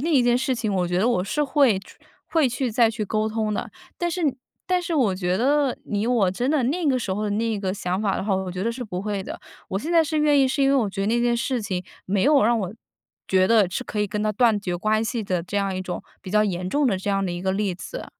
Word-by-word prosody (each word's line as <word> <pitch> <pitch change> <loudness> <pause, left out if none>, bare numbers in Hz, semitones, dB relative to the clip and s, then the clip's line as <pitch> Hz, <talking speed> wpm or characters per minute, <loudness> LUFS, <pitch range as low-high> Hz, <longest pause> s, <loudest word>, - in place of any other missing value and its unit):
那 325 +5 -1
一 260 - +5
件 240 0 +3
事 260 +1 0
情， 220 -4 -2
我 180 -2 0
觉 175 - -1
得 215 - +2
我 180 -7 +1
是 295 +10 -1
会 270 -8 +3
去 195 - -15 0.3
会 315 -6 +3
去 250 0 -2
再 230 0 +4
去 220 -1 -3
沟 215 +2 0
通 215 -1 -1
的。 - - -3 0.3
但 345 0 0
是 355 +1 -3 0.4
但 365 0 +2
是 345 -1 -3
我 230 -10 +2
觉 185 0 -1
得 275 +2 +2
以 205 +2 -2
我 225 -7 +3
真 245 +8 -1
的 295 -4 +2
那 315 +6 0
个 260 -2 +3
时 195 -5 -3
候 210 +2 -2
的 205 - -1
那 220 0 -1
个 190 -1 -2
想 185 0 -2
法 200 -3 0
的 - - -3
话， 200 -2 +1
我 190 -1 -2
觉 185 +2 -4
得 230 - 0
是 250 +1 -6
不 185 -5 -5
会 205 -2 -2
的。 - - -7 0.3
我 190 - -1
现 310 +11 -4
在 335 -1 +6
是 310 0 -1
愿 295 -2 +4
意， 265 - +4
是 275 +1 0
因 270 - +4
为 - - +3
我 235 -6 +2
觉 195 0 -4
得 200 - 0
那 235 +2 +2
件 240 0 +2
事 250 0 -1
情 185 -4 -3 0.2
没 190 0 +1
有 285 +1 +5
让 230 +2 +3
我， 195 0 -4 0.5
觉 185 0 +4
得 215 -4 +4
是 250 +8 -4
可 210 - -3
以 210 - +1
跟 210 +1 -3
她 215 0 +1
断 225 -1 +3
绝 180 -3 -3
关 215 +4 +1
系 225 0 -2
的 185 -3 -1
这 195 +4 -5
样 195 -1 -1
一 185 - -3
种 180 - -5 0.2
比 185 - -8
较 210 0 +4
严 180 -2 -2
重 290 -1 +2
的 200 -6 +2
这 200 +2 -2
样 195 0 +1
的 180 - -2
一 175 0 -5
个 190 0 0
例 195 -2 -1
子。 - - -7
215 Hz, 315 characters per minute, -24 LUFS, 190-255 Hz, 0.5 s, 在